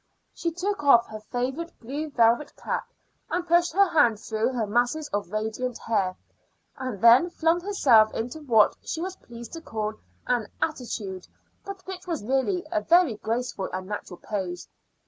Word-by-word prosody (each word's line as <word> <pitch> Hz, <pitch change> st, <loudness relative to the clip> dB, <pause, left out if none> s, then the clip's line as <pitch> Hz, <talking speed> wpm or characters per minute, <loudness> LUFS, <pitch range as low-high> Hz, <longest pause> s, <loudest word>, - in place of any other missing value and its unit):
She 335 Hz, -, -2 dB
took 360 Hz, +1 st, -3 dB
off 240 Hz, -5 st, +6 dB
her 215 Hz, -, -7 dB
favorite 260 Hz, +9 st, -4 dB
blue 285 Hz, +6 st, -4 dB
velvet 235 Hz, +1 st, +2 dB
cap -, -, -3 dB, 0.4 s
and 350 Hz, 0 st, -2 dB
pushed 345 Hz, +1 st, +4 dB
her 395 Hz, +2 st, +5 dB
hand 240 Hz, -, +3 dB
through 220 Hz, +2 st, -1 dB
her 235 Hz, -3 st, 0 dB
masses 245 Hz, +8 st, 0 dB
of 205 Hz, -3 st, -2 dB
radiant 220 Hz, +3 st, -2 dB
hair, 195 Hz, -5 st, 0 dB, 0.6 s
and 255 Hz, -6 st, -5 dB
then 235 Hz, -, +7 dB
flung 335 Hz, 0 st, +1 dB
herself 255 Hz, -, +4 dB
into 245 Hz, +7 st, -4 dB
what 230 Hz, -7 st, +4 dB
she 320 Hz, -, -4 dB
was 370 Hz, +2 st, -4 dB
pleased 235 Hz, -1 st, -11 dB
to 330 Hz, -, -6 dB
call 215 Hz, -7 st, -3 dB, 0.3 s
an 240 Hz, -4 st, 0 dB
attitude, 220 Hz, -, -3 dB, 0.4 s
but 395 Hz, -1 st, -8 dB
which 370 Hz, -1 st, -8 dB
was 330 Hz, -, -3 dB
really 270 Hz, -, 0 dB
a 320 Hz, -2 st, +1 dB
very 335 Hz, -, +4 dB
graceful 230 Hz, -2 st, -3 dB
and 185 Hz, 0 st, -4 dB
natural 200 Hz, -3 st, -6 dB
pose. 185 Hz, -4 st, -4 dB
245 Hz, 165 wpm, -26 LUFS, 220-330 Hz, 0.6 s, then